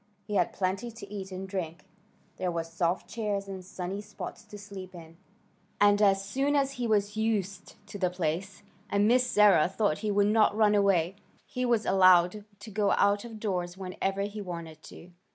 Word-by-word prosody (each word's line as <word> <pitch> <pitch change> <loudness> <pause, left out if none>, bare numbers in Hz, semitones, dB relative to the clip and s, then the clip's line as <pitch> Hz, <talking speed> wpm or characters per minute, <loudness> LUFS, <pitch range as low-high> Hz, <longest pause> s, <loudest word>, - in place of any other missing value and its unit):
He 210 - -6
had 185 -3 +2
plenty 195 +5 -2
to 220 -3 -10
eat 195 -2 -6
and 190 +1 -6
drink. 180 -4 -5 0.5
There 185 - -1
were 165 -1 -2
soft 170 +2 -2
chairs 205 -1 -3
and 190 -1 -7
sunny 190 +1 -5
spots 210 0 -8
to 210 - -11
sleep 195 -3 -10
in, 165 -1 -12 0.6
and 205 0 +5
as 195 -1 +3
soon 270 +8 0
as 275 -1 +2
he 250 -3 -3
was 205 -1 +1
used 200 -4 -2
to 205 - -9
the 185 -2 +2
place, 180 +3 -3 0.3
and 200 +1 +2
Miss 250 +2 +4
Sarah 205 -8 +5
thought 190 -5 0
he 215 - -2
would 205 0 +3
not 215 0 +3
run 210 -1 +4
away, 195 -3 +2 0.3
he 250 0 -3
was 235 -3 +1
allowed 185 +1 +4 0.2
to 220 - -9
go 205 0 +1
out 200 0 +2
of 225 -2 -9
doors 180 -4 -3
whenever 195 +1 -3
he 205 +1 -4
wanted 170 -4 -7
to. 180 - -13
200 Hz, 190 wpm, -29 LUFS, 180-210 Hz, 0.6 s, and